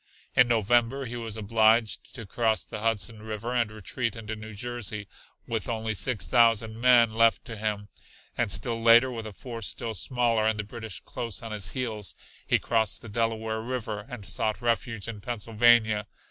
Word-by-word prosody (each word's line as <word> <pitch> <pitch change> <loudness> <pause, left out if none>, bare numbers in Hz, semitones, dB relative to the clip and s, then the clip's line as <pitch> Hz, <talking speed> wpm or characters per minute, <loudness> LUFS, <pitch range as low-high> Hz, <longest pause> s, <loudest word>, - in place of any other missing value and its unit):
In 125 - +6
November 120 +4 +2
he 120 0 -6
was 115 -2 -4
obliged 110 +1 +2
to 115 - -7
cross 110 +2 0
the - - -6
Hudson 110 -1 -1
River 110 +2 -4
and 120 -3 +1
retreat 115 +3 -3
into 110 -1 -6
New 110 0 -9
Jersey 110 -3 -5 0.4
with 115 +1 -3
only 110 -1 -1
six 105 -3 0
thousand 115 +3 +3
men 120 -3 +6
left 115 0 +3
to 115 - -7
him, 105 -1 -2 0.5
and 120 -4 0
still 115 +5 -1
later 120 +3 +7
with 115 -2 -5
a - - -7
force 115 +2 -6
still 115 -1 -3
smaller 115 0 +1
and 110 -1 0
the - - -1
British 110 -3 -8
close 115 -1 -5
on 115 - -6
his 105 -2 -1
heels, 110 -6 -2 0.3
he - - +4
crossed 110 -3 0
the 115 - -8
Delaware 110 0 -1
River 110 -4 -4
and 125 -6 -8
sought 110 +1 -2
refuge 115 -2 -1
in 110 -3 -6
Pennsylvania. 110 -1 +3
115 Hz, 175 wpm, -27 LUFS, 110-120 Hz, 0.5 s, later